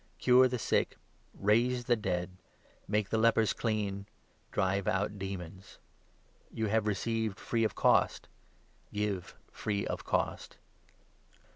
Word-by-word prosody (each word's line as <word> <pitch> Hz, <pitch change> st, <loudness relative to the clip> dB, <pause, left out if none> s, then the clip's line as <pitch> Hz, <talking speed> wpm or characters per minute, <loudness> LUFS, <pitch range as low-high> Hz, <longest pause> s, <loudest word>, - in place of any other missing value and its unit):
Cure 130 Hz, +1 st, +6 dB
the 125 Hz, 0 st, -2 dB
sick, -, -, 0 dB, 0.3 s
raise 120 Hz, +4 st, +2 dB
the 120 Hz, -, +3 dB
dead, 90 Hz, -4 st, -2 dB, 0.6 s
make 105 Hz, -1 st, 0 dB
the 110 Hz, -, +1 dB
lepers 110 Hz, -1 st, +4 dB
clean, 100 Hz, -3 st, -2 dB, 0.4 s
drive 95 Hz, +1 st, 0 dB
8 -, -, +4 dB
out 100 Hz, +2 st, -1 dB
demons. 95 Hz, 0 st, -7 dB, 0.7 s
You 110 Hz, -, -2 dB
have 110 Hz, 0 st, +1 dB
received 110 Hz, 0 st, -1 dB
free 115 Hz, -1 st, 0 dB
of 110 Hz, -, 0 dB
cost, -, -, +3 dB, 0.6 s
give 105 Hz, -4 st, -3 dB, 0.2 s
free 100 Hz, -2 st, -2 dB
of -, -, -4 dB
cost. -, -, -2 dB
105 Hz, 125 wpm, -31 LUFS, 100-115 Hz, 0.7 s, Cure